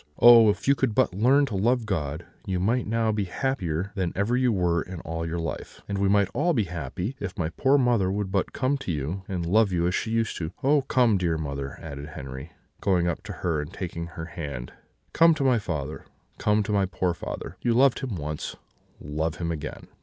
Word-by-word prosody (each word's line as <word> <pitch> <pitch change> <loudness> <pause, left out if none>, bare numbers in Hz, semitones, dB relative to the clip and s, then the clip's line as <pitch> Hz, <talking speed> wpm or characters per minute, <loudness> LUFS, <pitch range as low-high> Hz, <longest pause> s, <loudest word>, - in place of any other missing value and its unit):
Oh! 120 -2 +9
if 105 +4 -1
you 140 - +7
could 130 -5 0
but 130 -7 +3
learn 130 +9 +4
to 115 -7 -4
love 115 +4 +2
God, 80 -5 -2 0.2
you 95 -2 0
might 115 +6 +1
now 115 0 +1
be 105 -2 -1
happier 95 - -2
than 90 -3 -1
ever 100 +5 +1
you 125 -1 +3
were 90 -4 +1
in 90 0 -7
all 80 0 -4
your 80 +1 -3
life; 80 -2 -5
and 100 -1 -2
we 100 0 +2
might 100 -1 +4
all 170 +4 +2
be 115 -7 +2
happy 90 - -4
if 95 -3 -5
my 80 -2 -1
poor 135 +10 +3
mother 120 -8 +2
would 100 -1 -2
but 95 -1 0
come 135 +1 0
to 115 - -3
you 80 +5 -3
and 90 -3 -3
love 105 +3 +3
you 85 -1 +1
as 90 - +1
she 110 - -1
used 115 -1 0
to 80 - -3
do. 85 - -9
Oh! 145 +2 +4
come, 120 -6 +3
dear 85 -3 0
mother,' 70 -3 -4
added 70 +1 -7
Henri, 65 +4 -7 0.3
going 90 -3 +2
up 85 +2 -2
to 105 - -6
her 80 -4 +1
and 75 - -7
taking 85 -2 -5
her 85 -1 -7
hand; 70 -8 -6 0.4
'come 165 0 +6
to 145 - -1
my 125 -3 +4
father, 75 -6 -4 0.3
come 105 0 +2
to 105 - -3
my 100 -2 +2
poor 90 -1 0
father! 85 - -6
You 120 -2 +2
loved 135 +1 +4
him 125 -6 -3
once, 75 -2 -4 0.4
love 80 +3 -2
him 85 0 -3
again.' 75 -2 -6
95 Hz, 225 wpm, -26 LUFS, 80-115 Hz, 0.4 s, Oh